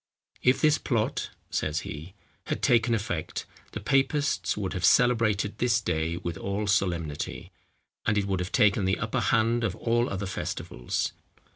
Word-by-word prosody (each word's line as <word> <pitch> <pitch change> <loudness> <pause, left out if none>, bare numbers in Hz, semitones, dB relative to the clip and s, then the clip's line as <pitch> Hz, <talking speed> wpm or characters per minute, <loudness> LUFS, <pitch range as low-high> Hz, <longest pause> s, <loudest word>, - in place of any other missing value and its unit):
"If 125 +1 +4
this 155 -1 +4
plot," 115 -4 -1 0.2
says 75 +2 -1
he, 80 +6 -8 0.3
"had - - -3
taken 115 -1 +4
effect, 95 -7 -3 0.3
the - - -3
papists 140 -1 +1
would 95 -3 -2
have 90 - -4
celebrated 110 -2 +3
this 120 -2 +3
day 80 -5 -1
with 85 -2 -4
all 100 +2 -2
solemnity; 85 -7 -1 0.6
and 105 0 +3
it 100 - +1
would 95 -2 -1
have 90 0 -3
taken 100 -1 +3
the 95 +1 +2
upper 115 0 -1
hand 115 0 +2
of 100 -6 0
all 120 +1 +1
other 100 +1 -3
festivals. 60 -9 -3
105 Hz, 155 wpm, -27 LUFS, 90-115 Hz, 0.6 s, If